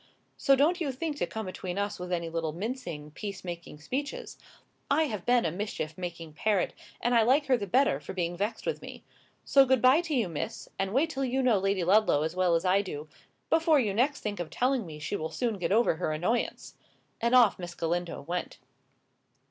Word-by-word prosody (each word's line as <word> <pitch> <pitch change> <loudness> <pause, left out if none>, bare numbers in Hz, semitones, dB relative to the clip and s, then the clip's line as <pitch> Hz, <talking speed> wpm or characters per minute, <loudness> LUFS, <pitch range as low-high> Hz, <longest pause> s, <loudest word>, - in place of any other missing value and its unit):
So 275 - +4
don't 320 +6 +2
you 290 -4 0
think 295 +3 -4
to - - -1
come 220 -1 -5
between 185 0 -5
us 200 -1 -2
with 180 0 -6
any 170 -1 -1
little 165 -1 -2
mincing, 175 - -5
peace 200 +5 -6
making 170 -4 -7
speeches. 285 - -4 0.5
I 320 - +4
have 215 - -4
been 245 -3 +4
a 165 - +1
mischief 175 -4 -4
making 170 -3 -6
parrot, 200 +3 +1 0.3
and 240 - +1
I 235 - +6
like 265 +6 +3
her 265 - +4
the 205 -4 -3
better 255 - +3
for - - -8
being 175 -2 -2
vexed 210 +5 -3
with 485 - -2
me. - - -10 0.4
So 275 - +6
good 260 -1 +3
bye 255 +7 +6
to 330 -4 -2
you, 230 -6 +2
Miss; 175 +7 -5
and 195 0 0
wait 290 +8 +2
till 270 -2 -2
you 260 +1 0
know 235 -6 +4
Lady 195 -1 0
Ludlow 185 -5 +4
as 160 +2 -3
well 180 -2 +3
as 165 +3 0
I 190 +2 +4
do, 155 -6 -7 0.4
before 325 -2 +4
you 210 -6 0
next 270 +7 +1
think 205 -2 -3
of 175 -3 -4
telling 250 - 0
me 155 -2 -8
she 150 +7 -3
will 160 -4 -3
soon 225 +3 -2
get 180 - -1
over 220 -5 +3
her 165 -2 -1
annoyance!" 180 +10 -1 0.5
And 235 +2 +3
off 235 -7 +6
Miss 175 -1 -6
Galindo 170 -2 -2
went. 175 +4 -4
205 Hz, 215 wpm, -29 LUFS, 175-255 Hz, 0.5 s, I